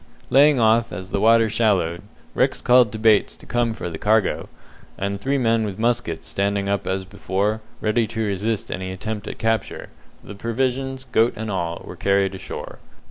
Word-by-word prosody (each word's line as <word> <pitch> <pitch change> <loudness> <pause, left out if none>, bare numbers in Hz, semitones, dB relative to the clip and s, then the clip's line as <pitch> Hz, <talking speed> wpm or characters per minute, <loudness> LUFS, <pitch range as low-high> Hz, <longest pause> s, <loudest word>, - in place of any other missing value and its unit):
Laying 140 0 +6
off 115 +1 +3
as 95 +2 -7
the 100 - 0
water 115 0 +5
shallowed, 95 -7 +1 0.3
Rex - - +1
called 125 -3 +5
to 110 - -5
Bates 110 -2 +3
to - - -16
come 120 -2 0
for - - -5
the 80 -2 -6
cargo, 110 -1 +1 0.5
and 100 0 -3
three 140 +4 0
men 115 -3 +2
with 100 -3 -4
muskets 115 -8 -1
standing 100 0 -1
up 100 0 -1
as 95 0 -1
before, 100 +2 -2 0.2
ready 110 +1 +1
to 110 +1 -3
resist 105 +2 -2
any 95 0 -4
attempt 105 +2 -5
at - - -6
capture, 115 -1 -2 0.3
the - - -9
provisions, 130 +4 -2
goat 115 +1 +3
and 110 0 -4
all, 85 -3 -3
were - - -8
carried 100 -1 +1
ashore. 95 - -7
110 Hz, 180 wpm, -22 LUFS, 100-115 Hz, 0.5 s, Laying